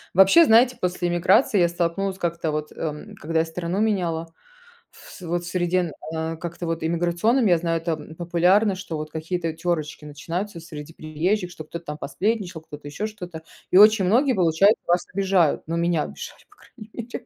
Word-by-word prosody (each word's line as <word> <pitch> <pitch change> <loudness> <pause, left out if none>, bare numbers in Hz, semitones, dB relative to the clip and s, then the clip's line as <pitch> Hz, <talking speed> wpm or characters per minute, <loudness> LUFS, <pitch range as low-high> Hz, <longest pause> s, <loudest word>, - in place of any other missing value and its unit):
Вообще, 195 - +7
знаете, 245 +1 +5
после 180 -1 -1
эмиграции 190 +7 +3
я 175 -1 +4
столкнулась 175 +3 -2
как-то 170 -2 -2
вот, 150 0 -3
эм, 160 +7 -6
когда 165 -3 -2
я - - -1
страну 170 +3 -3
меняла, 170 -6 -1 0.6
в - - -16
с - - -13
вот 175 0 -2
в - - -8
среде 175 0 0
н 175 -3 -2 0.2
а, 160 0 -3
как 170 +1 -6
это, 175 - -5
вот 165 0 -2
иммиграционном, 175 +9 +1
я 175 -3 +4
знаю, 165 0 -1
там, 160 -2 -4
популярно, 180 +5 +2
что 185 -3 -6
вот 155 0 -5
какие-то 165 +1 -3
тёрочки 160 -3 -3
начинаются 170 +6 -5
среди 160 -1 -10
приезжих, 175 +6 -2
что 165 -3 -9
кто-то 170 +2 -8
там 150 -1 -5
посплетничал, 180 +4 -2
кто-то 150 -2 -11
еще 150 +9 -4
что-то. 180 -6 -9 0.3
И - - +4
очень 210 -1 +7
многие, 255 +8 +3
получаются, 185 +3 +3
вас 175 +1 +2
обижают. 190 -5 +2
Ну, 165 - -2
меня 170 -2 +1
обижали, - - -9
по - - -24
крайней 215 -3 -15
мере. 235 0 -7
175 Hz, 190 wpm, -23 LUFS, 160-195 Hz, 0.6 s, Вообще